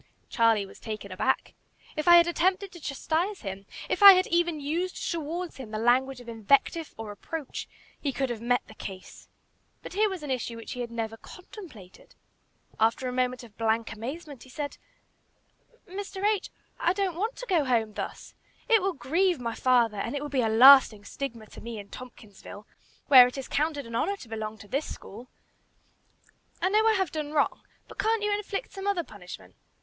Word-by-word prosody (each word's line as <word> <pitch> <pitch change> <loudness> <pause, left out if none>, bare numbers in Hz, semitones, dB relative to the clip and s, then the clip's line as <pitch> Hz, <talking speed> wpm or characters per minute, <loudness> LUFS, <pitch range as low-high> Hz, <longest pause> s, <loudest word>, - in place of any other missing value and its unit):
Charlie 225 -3 +3
was 195 - -14
taken 215 -3 -6
aback. 185 - -1 0.4
If 305 +2 -3
I 345 - +9
had 340 - +6
attempted 370 +3 0
to 345 - -11
chastise 330 +7 -2
him, 195 0 -7 0.2
if - - -2
I 400 -1 +13
had 370 0 +3
even 340 -2 +1
used 335 +6 -2
towards 335 +2 -4
him 260 -5 -8
the 215 - -4
language 250 +3 +2
of 245 - -13
invective 275 +8 +1
or 225 -1 -6
reproach, 275 +8 -6 0.3
he 285 - -1
could 265 -1 -2
have 225 -2 -5
met 245 +1 +1
the - - -14
case. 190 -2 -10 0.5
But - - -8
here 420 +2 +2
was 375 -5 -6
an 290 - -4
issue 240 -2 -2
which 230 - -9
he 250 - -6
had 240 -1 -3
never 225 -1 -4
contemplated. 290 - -13 0.6
After 225 +4 +2
a 250 - -3
moment 255 0 -1
of 225 -2 -16
blank 225 0 0
amazement, 270 +5 -7
he 260 - -14
said: 285 +2 -6 1.1
"Mr. 390 +1 -5
H., 420 -2 +1 0.3
I 345 - +2
don't 380 -3 -1
want 435 +7 -2
to - - -7
go 345 -7 +2
home 230 -5 0
thus. - - -6 0.3
It 455 -3 +5
will 385 0 0
grieve 335 +6 +1
my 230 -2 -3
father, 235 -4 +2
and 235 - -3
it 285 - -3
will 295 - -5
be 265 -2 +1
a 225 - +1
lasting 230 -3 +7
stigma 235 -5 -6
to - - -13
me 230 -1 -6
in 200 -1 -9
Tompkinsville, 215 -4 -11 0.4
where 255 -4 +9
it 250 - -7
is 270 - -5
counted 295 -2 -1
an 230 - -10
honor 390 +12 0
to 255 - -12
belong 220 -1 -5
to 205 - -13
this 275 +7 -2
school. 235 +5 -10 1.3
I 370 - +1
know 435 +2 +4
I 445 - +5
have 380 -6 0
done 305 -1 -4
wrong, 295 - +1 0.3
but - - -14
can't 440 +1 +1
you 415 0 +1
inflict 410 +2 -3
some 390 0 -6
other 385 -4 +1
punishment? 200 - -11
270 Hz, 195 wpm, -27 LUFS, 230-350 Hz, 1.3 s, I